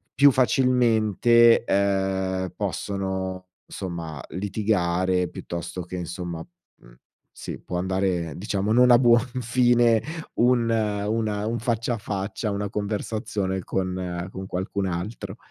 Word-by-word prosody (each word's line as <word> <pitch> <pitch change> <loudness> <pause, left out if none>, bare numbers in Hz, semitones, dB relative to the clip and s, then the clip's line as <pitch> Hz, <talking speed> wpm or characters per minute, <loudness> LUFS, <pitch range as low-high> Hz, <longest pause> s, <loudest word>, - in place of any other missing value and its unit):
più 140 +2 +7
facilmente, 120 -3 +4
ehm, 95 -2 0
possono 95 -2 -3 0.2
insomma 85 -6 -6
litigare 95 -2 0
piuttosto 85 +1 -6
che 90 +1 -8
insomma 85 -1 -5 0.4
mhmm, - - -18 0.4
sì, - - -7
può 90 - -5
andare 90 -3 -1
diciamo, 100 +2 -1
non 125 +1 +6
a 120 - +7
buon 120 -2 +6 0.2
fine 120 -1 +3 0.3
un 120 -1 +3
una 105 -1 0
un 115 +1 -1
faccia 115 +1 -1
a - - -6
faccia, 100 +2 -3
una 100 0 -2
conversazione 105 -2 -2
con 90 -1 -3
con 95 0 -6
qualcun 95 +1 -2
altro. 90 +5 -5
100 Hz, 115 wpm, -25 LUFS, 90-115 Hz, 0.4 s, più